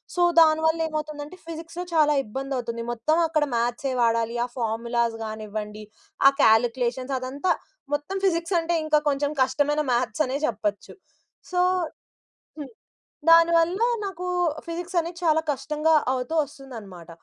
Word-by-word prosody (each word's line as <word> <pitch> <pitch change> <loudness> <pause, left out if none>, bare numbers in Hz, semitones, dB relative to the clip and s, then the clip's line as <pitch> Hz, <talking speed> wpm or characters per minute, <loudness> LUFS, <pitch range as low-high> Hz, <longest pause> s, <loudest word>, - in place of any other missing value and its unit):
So, 355 - 0 0.2
దాని 315 -1 +5
వల్లేమవుతుందంటే, 310 0 -3
ఫిజిక్స్‌లో 330 +1 -6
చాలా 305 -2 +4
ఇబ్బందవుతుంది. 245 -1 -4
మొత్తం 305 +7 0
అక్కడ 310 -2 +1
మ్యాథ్సే 240 +3 -1
వాడాలి. 230 0 +1
ఆ - - -7
ఫార్ములాస్ 235 0 -1
గానివ్వండి, 215 -1 -6 0.5
ఆ - - -1
కాలిక్యులేషన్స్ 245 +3 +2
అదంతా, 275 +8 -2 0.4
మొత్తం 295 +7 -4
ఫిజిక్సంటే 335 -1 +1
ఇంకా 310 0 +3
కొంచెం 285 +1 0
కష్టమైన 290 +3 +1
మ్యాథ్సనే 255 +3 0
జెప్పచ్చు. 210 -4 -3 0.6
సో 360 - 0 1.0
హ్మ్. 295 -2 -6 0.6
దానివల్లా 335 +5 +5 0.2
నాకు 365 -2 -5 0.4
ఫిజిక్సనేది 340 0 -3
చాలా 320 -1 +4
కష్టంగా 305 +3 0 0.2
అవుతూ 255 +4 -3
ఒస్తుందనమాట. 225 - -11
285 Hz, 110 wpm, -25 LUFS, 235-325 Hz, 1.0 s, దాని